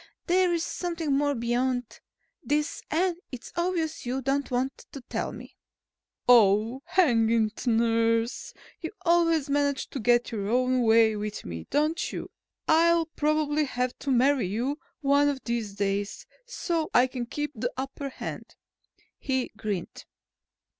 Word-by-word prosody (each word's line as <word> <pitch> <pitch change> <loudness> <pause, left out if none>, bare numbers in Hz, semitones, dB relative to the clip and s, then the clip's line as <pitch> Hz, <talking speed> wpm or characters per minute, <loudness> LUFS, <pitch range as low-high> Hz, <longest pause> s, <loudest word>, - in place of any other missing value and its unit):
There 365 0 +3
is 335 -1 0
something 335 -5 -2
more 285 0 +1
behind 245 +1 -1 0.4
this 300 +2 -1
and 345 +2 +1
it's 255 -3 -9
obvious 340 -2 -1
you 250 +2 -2
don't 275 +2 0
want 260 +1 -2
to 275 - -7
tell 245 - -3
me." - - -11 0.7
"Oh, 225 +1 +5
hang 290 -12 +3
it, 225 +1 0
nurse! 230 0 +1 0.3
You 325 +3 -6
always 330 -3 +3
manage 285 -1 0
to 275 - -4
get 240 +2 +2
your 205 -3 -3
own 255 +1 +2
way 225 -1 +5
with 210 0 -5
me, 85 -2 -7
don't 310 +3 0
you? - - -6 0.4
I'll 335 +1 +4
probably 305 0 +1
have 250 -2 -2
to 280 - -4
marry 260 -3 +3
you 245 +10 -2 0.2
one 285 0 +4
of 275 -2 -3
these 230 -4 -3
days, 200 0 -2 0.2
so 335 -9 -2
I 245 - +7
can 250 -2 -5
keep 295 +4 -3
the 240 0 -3
upper 270 +1 -4
hand," - - -7 0.6
he 260 -2 -1
grinned. 210 -5 -5
260 Hz, 145 wpm, -27 LUFS, 230-300 Hz, 0.7 s, I